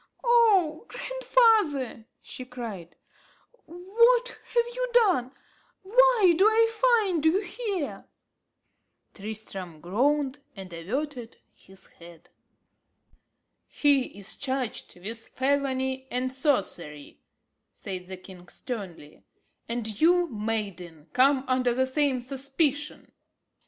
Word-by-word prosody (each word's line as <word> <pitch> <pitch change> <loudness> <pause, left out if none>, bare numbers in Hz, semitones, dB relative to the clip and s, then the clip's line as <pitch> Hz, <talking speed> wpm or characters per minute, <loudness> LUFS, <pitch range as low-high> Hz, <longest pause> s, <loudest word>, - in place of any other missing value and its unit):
"Oh 430 -8 +3
grandfather!" 435 - +1 0.2
she 255 - -8
cried, 230 -9 -8 0.7
"what 465 +9 +2
have 475 0 -2
you - - -2
done? 370 - +3 0.5
why 455 -3 +5
do 370 - +3
I 455 +1 +3 0.3
find 355 -6 -1
you 320 +4 +4
here?" 405 - -4 1.1
Tristram 195 -5 -7
groaned, 270 - 0 0.2
and 190 -3 -10
averted 245 - -5 0.2
his 190 0 -15
head. 170 -1 -16 1.4
"He 280 -7 +2
is 200 +1 -5
charged 260 -8 -4
with 225 +5 -6
felony 265 -1 -1
and 255 +1 -2
sorcery," 195 - -2 0.5
said 185 -5 -7
the 190 0 -7
king 180 -1 -14
sternly, 185 - -8 0.5
"and 225 -3 -3
you, 350 +2 +4
maiden, 200 - -5
come 265 +1 +4
under 255 -2 +1
the 260 +1 +2
same 260 -2 0
suspicion." 275 +3 -2
260 Hz, 100 wpm, -27 LUFS, 210-345 Hz, 1.4 s, why